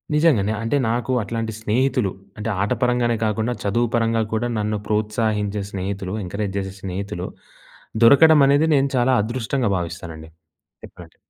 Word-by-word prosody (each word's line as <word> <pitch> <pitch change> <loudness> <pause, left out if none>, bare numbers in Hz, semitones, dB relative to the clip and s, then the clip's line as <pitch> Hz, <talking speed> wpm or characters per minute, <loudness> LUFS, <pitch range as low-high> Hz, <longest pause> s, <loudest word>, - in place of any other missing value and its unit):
నిజంగానే. 130 -10 +3
అంటే 115 +5 0
నాకు 120 +3 -1
అట్లాంటి 115 +1 -4
స్నేహితులు, 120 -1 +1 0.3
అంటే 105 +1 -3
ఆట 100 - -1
పరంగానే 120 -2 +1
కాకుండా 110 +3 -1
చదువు 115 +4 +1
పరంగా 115 -1 +1
కూడా 110 +2 0
నన్ను 105 0 -1
ప్రోత్సహించే 105 -1 -1
స్నేహితులు, 95 0 -4
ఎంకరేజ్ 100 +2 -4
చేసే 95 -1 -5
స్నేహితులు 95 -1 -5 0.8
దొరకడం 150 +5 +7
అనేది 145 +3 +4
నేను 140 0 +2
చాలా 125 +1 +3
అదృష్టంగా 120 +1 -1
భావిస్తానండి. 85 -2 -7 0.5
చెప్పాలంటే. - - -13
110 Hz, 135 wpm, -21 LUFS, 100-120 Hz, 0.8 s, దొరకడం